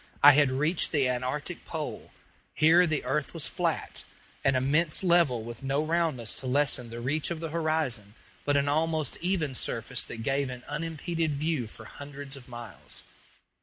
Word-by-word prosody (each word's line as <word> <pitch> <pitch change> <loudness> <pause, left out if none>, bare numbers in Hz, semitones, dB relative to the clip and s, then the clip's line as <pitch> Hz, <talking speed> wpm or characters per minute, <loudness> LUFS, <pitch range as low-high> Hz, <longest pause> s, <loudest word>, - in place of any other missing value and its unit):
I 145 - +12
had 145 -1 +5
reached 150 +6 +2
the 140 -4 +3
antarctic 125 +3 -2
pole. - - -5 0.5
Here 170 +3 +6
the 155 -2 -1
earth 140 +5 -1
was 160 - -1
flat - - -1 0.4
an 135 -1 +3
immense 150 +7 +2
level 170 -10 +3
with 115 0 -8
no 140 +2 0
roundness 155 -8 0
to 130 - -5
lessen 135 -2 +3
the 115 +1 -6
reach 145 +6 -1
of 170 -2 -3
the 165 0 -4
horizon 155 -10 0 0.3
but 145 0 +2
an 140 0 +2
almost 155 0 +1
even 175 -6 0
surface - - -1
that 115 - -7
gave 135 +1 0
an 125 -1 -7
unimpeded 160 0 -2
view 150 -4 -1
for 110 +1 -10
hundreds 140 +2 -8
of 130 -3 -12
miles. 120 -2 -8
145 Hz, 165 wpm, -29 LUFS, 130-160 Hz, 0.5 s, I